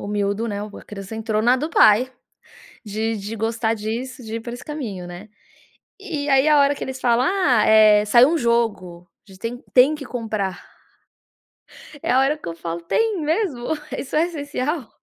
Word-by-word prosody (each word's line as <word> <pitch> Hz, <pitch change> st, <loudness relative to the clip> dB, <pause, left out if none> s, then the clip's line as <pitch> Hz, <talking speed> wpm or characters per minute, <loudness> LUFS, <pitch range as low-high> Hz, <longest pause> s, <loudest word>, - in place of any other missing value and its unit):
o -, -, -6 dB
miúdo, 205 Hz, +2 st, -1 dB
né, 205 Hz, -1 st, -4 dB
a 210 Hz, 0 st, -10 dB
criança 200 Hz, +1 st, -8 dB
entrou 220 Hz, -1 st, -1 dB
na 245 Hz, +2 st, +4 dB
do 305 Hz, +5 st, -3 dB
pai 230 Hz, -1 st, +5 dB, 0.8 s
de 220 Hz, +2 st, -2 dB
de 205 Hz, +3 st, -6 dB
gostar 225 Hz, +1 st, -1 dB
disso, 240 Hz, +5 st, -5 dB
de 220 Hz, 0 st, -6 dB
ir 230 Hz, -, -4 dB
por 235 Hz, +1 st, -7 dB
esse 245 Hz, -, -9 dB
caminho, 225 Hz, -13 st, -6 dB
né? 175 Hz, +4 st, -10 dB, 0.7 s
E 330 Hz, -8 st, -4 dB
e -, -, -4 dB
aí, 270 Hz, +2 st, +4 dB
a 300 Hz, -1 st, +5 dB
hora 280 Hz, 0 st, +3 dB
que -, -, -6 dB
eles 265 Hz, 0 st, -6 dB
falam: 245 Hz, +1 st, +2 dB
“Ah, 285 Hz, -, +2 dB
eh, 215 Hz, -1 st, +6 dB
saiu 240 Hz, +5 st, +6 dB
um 335 Hz, -, +1 dB
jogo 210 Hz, -, -1 dB, 0.2 s
a -, -, -14 dB
gente 190 Hz, -, -16 dB
tem 240 Hz, +3 st, -5 dB
tem 265 Hz, +4 st, +6 dB
que 295 Hz, -, -8 dB
comprar”. 215 Hz, -6 st, -3 dB, 1.4 s
É -, -, 0 dB
a 260 Hz, -, +5 dB
hora 275 Hz, +3 st, +2 dB
que 300 Hz, -, -10 dB
eu -, -, -5 dB
falo: 170 Hz, 0 st, -5 dB
"Tem 420 Hz, -, 0 dB
mesmo? 310 Hz, -, -1 dB, 0.3 s
Isso 270 Hz, -, -7 dB
é 315 Hz, +2 st, +4 dB
essencial?" 290 Hz, -4 st, -4 dB
235 Hz, 195 wpm, -21 LUFS, 210-280 Hz, 1.4 s, eh